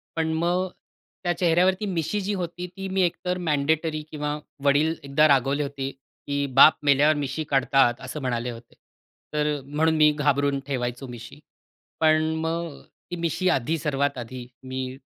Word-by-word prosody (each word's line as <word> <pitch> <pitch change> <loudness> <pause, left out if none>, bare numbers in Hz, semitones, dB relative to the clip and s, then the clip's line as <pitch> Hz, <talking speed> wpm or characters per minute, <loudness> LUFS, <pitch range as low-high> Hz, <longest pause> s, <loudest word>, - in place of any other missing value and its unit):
पण 160 -1 0
मग 175 +3 +1 0.6
त्या 175 0 +1
चेहऱ्यावरती 185 +3 +2
मिशी 185 +2 -1
जी 205 +2 -2
होती 180 -1 -4
ती 195 0 -4
मी 190 0 +1
एकतर 180 +1 0
मँडेटरी 155 +2 +1
किंवा 150 0 -3 0.3
वडील 150 +3 +3
एकदा 140 +3 +4
रागवले 140 +1 +2
होते 140 -1 -4
की 140 +1 -5
"बाप 150 +3 +8
मेल्यावर 145 +2 +5
मिशी 145 +2 -3
काढतात," 135 -2 +3
असं 150 +3 -6
म्हणाले 125 -1 -2
होते. 115 0 -12 0.6
तर 150 0 +1
अ, - - -9
म्हणून 160 +3 +1
मी 155 -1 +6
घाबरून 140 -1 +1
ठेवायचो 125 -1 -3
मिशी. 120 +3 -10 0.6
पण 155 0 +3
मग 165 -1 -3 0.3
ती - - -2
मिशी 170 +2 0
आधी 160 +2 +1
सर्वात 140 -2 -1
आधी 125 +1 -7 0.2
मी 130 0 -5
150 Hz, 155 wpm, -25 LUFS, 135-165 Hz, 0.6 s, बाप